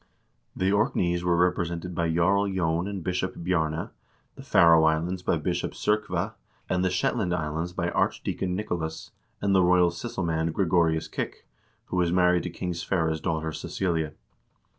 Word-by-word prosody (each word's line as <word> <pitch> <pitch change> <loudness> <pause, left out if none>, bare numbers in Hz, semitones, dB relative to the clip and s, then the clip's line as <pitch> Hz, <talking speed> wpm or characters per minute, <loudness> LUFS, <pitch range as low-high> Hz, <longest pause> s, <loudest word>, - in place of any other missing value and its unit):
The 95 +1 +1
Orkneys 90 -4 +1
were 85 -1 +2
represented 90 0 0
by 85 0 0
Jarl 95 +5 +3
J6n 90 -1 0
and 100 -4 -5
Bishop 90 +1 -2
Bjarne, 80 -3 -1 0.4
the - - -11
Faroe 85 -2 +5
Islands 85 +4 +1
by - - +1
Bishop - - -2
S0rkve, 105 +1 -1 0.3
and 90 0 0
the 95 - +2
Shetland 90 0 0
Islands 80 +1 -3
by 90 -1 -2
Arch - - 0
deacon 90 -1 -2
Nicolas, 85 -6 -4 0.3
and 100 -1 +2
the 95 - +5
royal 90 -1 +4
sysselmand 85 -4 -2
Gregorius 80 -3 +2
Kik, - - -5 0.4
who 90 - -4
was 85 -1 +2
married 90 -1 +3
to 90 - -4
King 90 +1 -4
Sverre's 80 -2 -1
daughter 80 -2 -1
Cecilia. 80 -2 -2
90 Hz, 155 wpm, -26 LUFS, 80-90 Hz, 0.4 s, Faroe